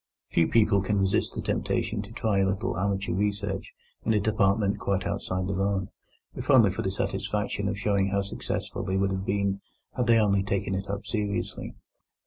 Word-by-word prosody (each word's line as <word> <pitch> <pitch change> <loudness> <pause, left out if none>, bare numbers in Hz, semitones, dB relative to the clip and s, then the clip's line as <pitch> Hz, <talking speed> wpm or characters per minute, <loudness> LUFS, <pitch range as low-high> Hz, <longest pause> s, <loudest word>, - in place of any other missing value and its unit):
Few 80 - +3
people 105 -3 +4
can 100 +2 0
resist 95 -1 +1
the - - -3
temptation 105 -2 -1
to 105 +1 -10
try 110 -3 0
a 95 - +3
little 100 0 -1
amateur 100 +1 -1
research 100 0 -1 0.3
in 110 - +2
a - - +4
department 100 -1 +2
quite 95 -1 -1
outside 90 0 -2
their 95 0 -1
own, 100 -1 0 0.4
if - - -7
only - - +7
for - - -3
the - - -1
satisfaction 105 -1 -1
of 100 0 -2
showing 100 -1 +1
how 100 0 0
successful 100 0 -4
they 95 0 -1
would 95 0 +1
have 95 0 -2
been 100 0 0 0.3
had 125 -2 0
they 115 -1 +6
only 100 -3 +3
taken 95 0 -1
it 95 +1 -3
up 100 +1 -3
seriously. 105 -3 -3
100 Hz, 190 wpm, -27 LUFS, 95-105 Hz, 0.4 s, only